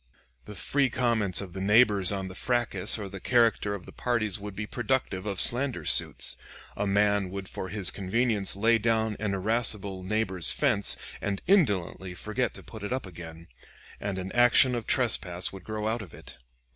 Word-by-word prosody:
The 105 - -9
free 135 +8 +1
comments 115 -7 +1
of 95 -3 -8
the 95 - -5
neighbors 105 -2 +4
on 95 -1 -3
the 95 - -8
fracas 115 -2 -1
or 105 -2 -5
the 95 0 -8
character 115 -3 +2
of 95 - -9
the - - -11
parties 110 -5 -1
would 100 -1 -8
be 105 +2 -4
productive 115 -4 -2
of 100 -2 -3
slander 120 - 0
suits. - - +1 0.4
A 100 - -2
man 100 -1 +2
would 95 0 -6
for 95 - -6
his 100 -2 +3
convenience 105 +1 +1
lay 115 +3 +3
down 110 -1 +1
an 100 -2 -1
irascible 100 -2 0
neighbor's 95 -3 -1
fence, 115 -9 +3 0.2
and 100 -1 -2
indolently 100 - +1
forget 110 +7 -2
to - - -10
put 110 - -11
it 105 - -5
up 130 -2 -2
again, 85 -2 -10 0.5
and 100 -2 -3
an 95 0 -5
action 120 +1 +5
of 120 -2 -4
trespass 95 -9 0
would 95 -2 -10
grow 110 +2 -4
out 115 +1 -1
of 90 -8 -11
it. - - -12
105 Hz, 185 wpm, -28 LUFS, 95-115 Hz, 0.5 s, action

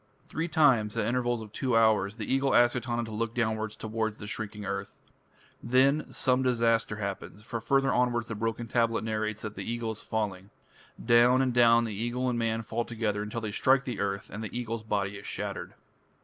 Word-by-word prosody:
Three 165 +2 -3
times, 135 -10 +3
at - - +1
intervals 120 -1 0
of 105 - -12
two 125 0 0
hours, 105 -3 +3
the 110 -2 -5
Eagle 135 +3 +1
asks 120 +1 +5
Etana 120 -1 -2
to 110 - -7
look 115 +1 -3
downwards 110 -2 -1
towards 110 0 -3
the 105 - -8
shrinking 105 0 -5
earth. 100 0 -4 0.6
Then 135 +5 +2
some 130 0 +1
disaster 115 -3 +2
happens, 100 0 -6
for 115 0 -5
further 135 +4 +2
onwards 120 -1 +1
the 115 - -5
broken 115 +2 -3
tablet 115 -1 +1
narrates 110 -1 -2
that 105 -1 -5
the - - -6
Eagle 115 -1 -2
is 110 - -7
falling. 100 -3 -3 0.6
Down 120 +2 +5
and 130 -2 +1
down 115 -1 +5
eagle 120 +4 -2
and 120 - -1
man 115 0 0
fall 115 +2 -2
together 110 -3 -2
until 105 +2 -4
they 110 -2 -3
strike 130 +5 +3
the 125 -3 -5
earth, 100 0 -2
and 110 +2 -5
the 110 +2 -5
Eagle's 115 -2 -3
body 100 -2 -2
is - - -10
shattered. - - -5
115 Hz, 195 wpm, -29 LUFS, 110-120 Hz, 0.6 s, asks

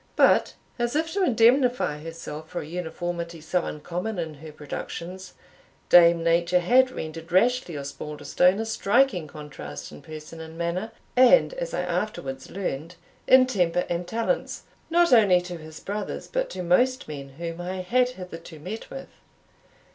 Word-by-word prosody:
But, - - +4 0.2
as 240 +2 0
if 320 +1 0
to 395 0 +1
indemnify 245 - +3
herself 160 -1 -8
for 175 - -4
a - - -8
uniformity 170 0 -4
so 165 +3 -1
uncommon 180 +7 -4
in 165 -3 -3
her 155 +2 -11
productions, 175 +5 -7 0.5
Dame 170 -1 +7
Nature 170 +2 +3
had 255 +8 +5
rendered 165 -6 -7
Rashleigh 225 - +2
Osbaldistone 150 +6 0
a 225 - -1
striking 220 -5 +2
contrast 150 -1 -9
in 75 - -11
person 155 +1 -9
and 160 0 -10
manner, 175 +6 -2 0.2
and, 255 - +6
as - - -4
I - - 0
afterwards 175 -7 -3
learned, 170 -3 -4 0.3
in 260 0 +7
temper 180 -8 +1
and 175 0 -2
talents, 230 - -2 0.3
not 340 -2 +4
only 200 -6 +6
to 180 -1 -7
his 155 -1 -11
brothers, 205 +1 -5
but - - -2
to 180 - -5
most 250 +9 +2
men 140 -2 -7
whom 170 0 -5
I 185 +1 -4
had 250 +7 +2
hitherto 180 -7 -9
met 185 +9 -7
with. 270 - -8
180 Hz, 155 wpm, -25 LUFS, 160-230 Hz, 0.5 s, Dame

